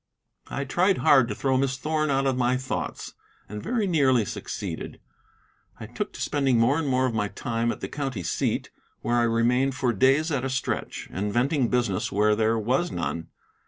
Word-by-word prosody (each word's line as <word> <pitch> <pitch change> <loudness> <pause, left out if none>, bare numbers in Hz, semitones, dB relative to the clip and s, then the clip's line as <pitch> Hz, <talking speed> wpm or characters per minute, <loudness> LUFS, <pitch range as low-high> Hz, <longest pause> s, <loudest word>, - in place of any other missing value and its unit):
I 140 - -3
tried 180 +8 +2
hard 140 -6 +5
to 105 - -4
throw 130 +2 +1
Miss 135 0 0
Thorn 155 +2 -1
out 135 0 +1
of 135 -1 +2
my 125 0 +1
thoughts, 130 +1 -4 0.3
and 105 +1 -6
very 235 -3 -1
nearly 135 - +3
succeeded. - - -6 0.8
I - - -6
took - - -4
to - - -8
spending 135 -4 +1
more 125 +7 +3
and 160 - -2
more 130 -1 +2
of 125 - -1
my 105 -2 0
time 115 +2 -2
at - - -7
the - - -3
county 135 -10 -4
seat, - - -1 0.3
where 120 - 0
I - - +4
remained 125 +4 +2
for 125 -2 0
days 135 - +3
at 135 -4 -1
a 135 - -1
stretch, 130 -1 -3
inventing 120 - 0
business 120 -7 0
when 105 +2 +3
there 110 +1 +2
was 130 +11 0
none. 85 -1 -3
130 Hz, 190 wpm, -26 LUFS, 115-140 Hz, 0.8 s, hard